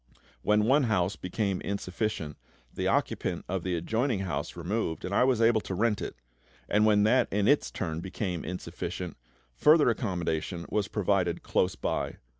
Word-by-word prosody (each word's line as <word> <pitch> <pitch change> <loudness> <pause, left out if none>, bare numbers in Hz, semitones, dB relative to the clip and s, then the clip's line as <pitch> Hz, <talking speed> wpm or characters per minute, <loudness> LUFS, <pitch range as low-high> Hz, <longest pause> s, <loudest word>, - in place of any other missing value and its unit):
When 105 0 +3
one 135 +3 +4
house 95 -4 +1
became 95 +1 -2
insufficient, 100 -5 -3 0.4
the - - -1
occupant - - 0
of 95 0 -2
the 90 0 -1
adjoining 110 +6 0
house 80 -7 -3
removed, 85 0 -2
and 90 - -4
I 100 - +4
was 125 -3 +2
able 115 -1 +4
to 95 - -5
rent 105 +1 +1
it; - - -5 0.5
and 105 +1 +3
when 105 -1 +4
that 120 +5 +4
in 100 +1 +1
its 145 - +3
turn 80 -3 -3
became 90 -1 -3
insufficient, 90 +1 -5 0.4
further 150 - +5
accommodation 90 -5 -2
was 105 -2 +1
provided 95 -4 0
close 90 +1 +1
by. - - -2
100 Hz, 160 wpm, -29 LUFS, 90-110 Hz, 0.5 s, further